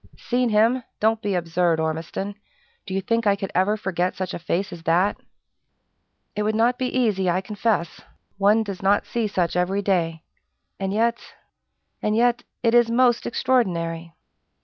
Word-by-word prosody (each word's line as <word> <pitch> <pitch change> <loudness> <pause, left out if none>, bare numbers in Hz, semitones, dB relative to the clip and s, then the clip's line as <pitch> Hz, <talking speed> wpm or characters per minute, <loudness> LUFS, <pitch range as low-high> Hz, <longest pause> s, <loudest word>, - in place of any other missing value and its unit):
"Seen 245 0 0
him? 225 +4 +3 0.2
Don't 220 +1 +2
be 205 -3 -1
absurd, 170 -1 +1
Ormiston! 160 +5 -3 0.5
Do 190 - -4
you 195 - 0
think 230 +3 0
I 200 - +4
could 195 -1 -5
ever 195 +4 +2
forget 180 -3 -1
such 185 -1 -4
a - - -4
face 175 +3 -2
as 170 - -9
that?" 175 +5 +2 1.2
"It 210 - -1
would 215 +1 0
not 240 +3 +2
be 255 - 0
easy, 215 -8 +1
I 175 +1 +2
confess. 200 -3 -2 0.4
One 210 +3 +4
does 200 -3 -6
not 200 +1 +2
see 235 -2 -1
such 180 -4 -1
every 190 +3 0
day. 165 -4 0 0.6
And 195 0 -2
yet 230 +3 +1 0.8
and 210 0 0
yet 240 +1 +2 0.2
it 230 -1 +3
is 240 -1 +5
most 240 0 +3
extraordinary!" 170 -10 -1
200 Hz, 165 wpm, -23 LUFS, 180-230 Hz, 1.2 s, is